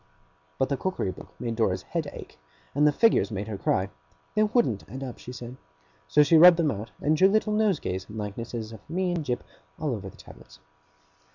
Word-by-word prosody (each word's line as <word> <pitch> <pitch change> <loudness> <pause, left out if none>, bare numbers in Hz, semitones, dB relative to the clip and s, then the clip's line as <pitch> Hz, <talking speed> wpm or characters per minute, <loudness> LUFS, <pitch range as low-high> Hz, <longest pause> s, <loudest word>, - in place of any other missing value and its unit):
But 130 - +1
the 140 - 0
cookery 185 - -2
book 95 - -11
made 115 -2 -3
Dora's 95 -5 0
head - - -3
ache, - - -11 0.3
and 150 +2 +4
the - - +5
figures 225 - +3
made 105 -1 -4
her 110 - -4
cry. 95 0 0 0.4
They 215 - +2
wouldn't 215 - +2
add 135 +5 -6
up, 125 -3 -7
she 125 - -9
said. 125 0 -8 0.5
So 150 - +5
she 160 +3 +5
rubbed 175 0 +9
them 160 -4 +2
out, 105 +1 -6
and 155 +2 +2
drew 185 +5 +6
little 215 +1 +2
nosegays 180 - 0
and 110 - -8
likenesses 110 +2 -5
of 110 - -9
me 180 +2 0
and 170 -3 -1
Jip, 125 -3 -2 0.4
all 155 -4 -1
over 100 -4 -5
the - - -17
tablets. - - -15
130 Hz, 205 wpm, -27 LUFS, 110-170 Hz, 0.5 s, rubbed